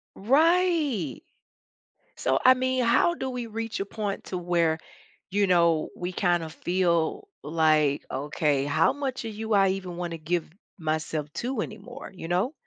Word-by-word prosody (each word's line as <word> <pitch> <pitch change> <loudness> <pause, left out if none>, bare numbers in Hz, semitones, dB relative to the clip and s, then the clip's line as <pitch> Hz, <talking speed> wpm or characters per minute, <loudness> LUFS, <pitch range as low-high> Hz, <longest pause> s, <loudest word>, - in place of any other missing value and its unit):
Right. 295 - +2 0.9
So, 130 0 +1
I 255 - +9
mean, 255 0 0
how 245 +9 +3
do 265 - -3
we 245 -2 -4
reach 225 0 -4
a 195 - -1
point 205 -1 -4
to 185 - -4
where, 170 -2 +1 0.5
you 200 +1 +2
know, 170 -3 +3
we 180 +1 -4
kind 175 -1 +1
of 160 -1 -7
feel 175 - 0 0.2
like, 155 -2 +2
"Okay, 145 0 0
how 145 +3 +3
much 270 -3 -4
of 220 - -5
you 220 0 -2
I 195 -1 +5
even 185 -2 -4
want 175 -1 -3
to 165 - -4
give 165 +2 -2 0.3
myself 155 -2 -2
to 245 -2 -2
anymore?" 235 +5 -8
You 165 - -7
know? 190 - +1
185 Hz, 160 wpm, -26 LUFS, 160-235 Hz, 0.9 s, I